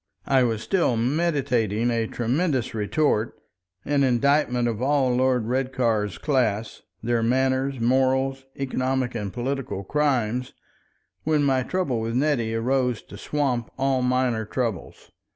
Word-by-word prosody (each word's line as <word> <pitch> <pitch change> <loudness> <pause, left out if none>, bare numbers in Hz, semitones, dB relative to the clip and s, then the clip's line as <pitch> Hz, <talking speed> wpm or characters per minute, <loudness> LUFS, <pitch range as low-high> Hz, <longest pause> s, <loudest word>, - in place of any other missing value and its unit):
I 135 -1 +3
was 115 -3 0
still 170 - +1
meditating 125 - +1
a 115 -1 0
tremendous 130 +2 -1
retort, 110 +1 0 0.5
an 145 -1 +1
indictment 125 -1 +2
of 115 -1 -3
all 135 -2 +2
Lord 125 -2 +2
Redcar's 120 -6 0
class, 115 - -1 0.2
their 120 0 +1
manners, 130 +2 +1
morals, 130 +2 +1
economic 130 -1 -1
and 105 -4 -4
political 130 -3 -3
crimes, 125 -2 0 0.7
when 155 -1 +2
my 135 -2 +2
trouble 135 -4 -1
with 115 +1 -3
Nettie 125 -5 +1
arose 125 0 0
to - - -12
swamp 125 0 -1
all 135 -1 +1
minor 125 -3 +1
troubles. 110 -4 -4
125 Hz, 125 wpm, -24 LUFS, 115-135 Hz, 0.7 s, I